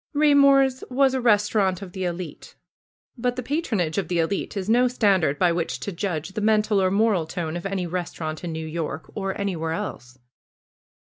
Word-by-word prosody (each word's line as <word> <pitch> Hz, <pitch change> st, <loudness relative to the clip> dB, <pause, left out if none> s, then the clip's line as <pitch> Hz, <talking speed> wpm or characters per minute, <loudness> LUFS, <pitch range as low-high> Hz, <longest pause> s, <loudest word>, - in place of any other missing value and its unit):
Raymor's 280 Hz, -3 st, +5 dB
was 265 Hz, +1 st, +3 dB
a 260 Hz, -, 0 dB
restaurant 205 Hz, -4 st, +2 dB
of 185 Hz, -, -9 dB
the 190 Hz, 0 st, -4 dB
elite. 175 Hz, 0 st, -6 dB, 0.6 s
But 245 Hz, +1 st, 0 dB
the 255 Hz, -, -4 dB
patronage 220 Hz, -, -1 dB
of 185 Hz, -, -3 dB
the 175 Hz, -, -1 dB
elite 180 Hz, +5 st, -1 dB
is 190 Hz, -1 st, -3 dB
no 245 Hz, +3 st, +4 dB
stand 205 Hz, -7 st, +2 dB
ard 145 Hz, -1 st, +1 dB
by 180 Hz, -2 st, +3 dB
which 170 Hz, -1 st, -2 dB
to 200 Hz, -, -4 dB
judge 175 Hz, -3 st, -3 dB
the 200 Hz, +2 st, -5 dB
mental 210 Hz, -1 st, +3 dB
or 185 Hz, -, +3 dB
moral 200 Hz, -4 st, +2 dB
tone 160 Hz, -1 st, -4 dB
of 175 Hz, +2 st, -3 dB
any 195 Hz, -2 st, -2 dB
restaurant 170 Hz, -2 st, -4 dB
in 175 Hz, -, -3 dB
New 160 Hz, 0 st, -4 dB
York, 155 Hz, -2 st, -5 dB
or 195 Hz, -1 st, -3 dB
anywhere 165 Hz, -5 st, -2 dB
else. 130 Hz, -5 st, -6 dB
195 Hz, 190 wpm, -24 LUFS, 170-220 Hz, 0.6 s, Raymor's